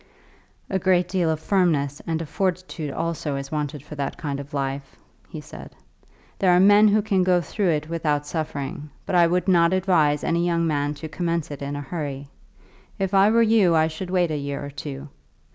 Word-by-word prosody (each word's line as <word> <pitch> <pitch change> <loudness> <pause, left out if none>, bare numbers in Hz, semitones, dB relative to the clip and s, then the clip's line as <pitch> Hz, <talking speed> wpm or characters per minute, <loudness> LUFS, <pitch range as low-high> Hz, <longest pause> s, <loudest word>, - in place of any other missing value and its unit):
"A 190 - -1
great 180 -1 +2
deal 180 -3 0
of 160 -1 -1
firmness 155 -6 +1
and 165 0 -1
of - - -9
fortitude 180 -1 -2
also 160 -1 -3
is 140 0 -6
wanted 150 -2 -3
for 150 - -10
that 140 -2 -4
kind 140 -3 -4
of 140 +1 -9
life," 135 -1 -4 0.3
he - - -7
said. - - -11 0.6
"There 190 - +3
are 180 0 +5
men 205 +3 +6
who 210 0 +3
can 200 -3 +1
go 180 -1 +3
through 190 +2 -1
it 155 -2 0
without 155 -3 -1
suffering, 145 -2 -4 0.2
but - - -4
I 175 -1 +5
would 180 +3 0
not 170 -1 +4
advise 170 -6 +2
any 170 +1 +1
young 170 -1 +1
man 145 -2 -1
to 145 +2 -7
commence 165 -1 -2
it 145 - -7
in 140 +1 -4
a 145 - -4
hurry. 140 -2 -5 0.7
If 195 0 -2
I 195 +1 +5
were 230 +1 +4
you 215 -6 +4
I 160 0 +4
should 160 +3 -6
wait 180 -3 +1
a 150 - -1
year 140 0 -4
or 145 - -7
two. 140 0 -7
160 Hz, 205 wpm, -23 LUFS, 145-180 Hz, 0.7 s, men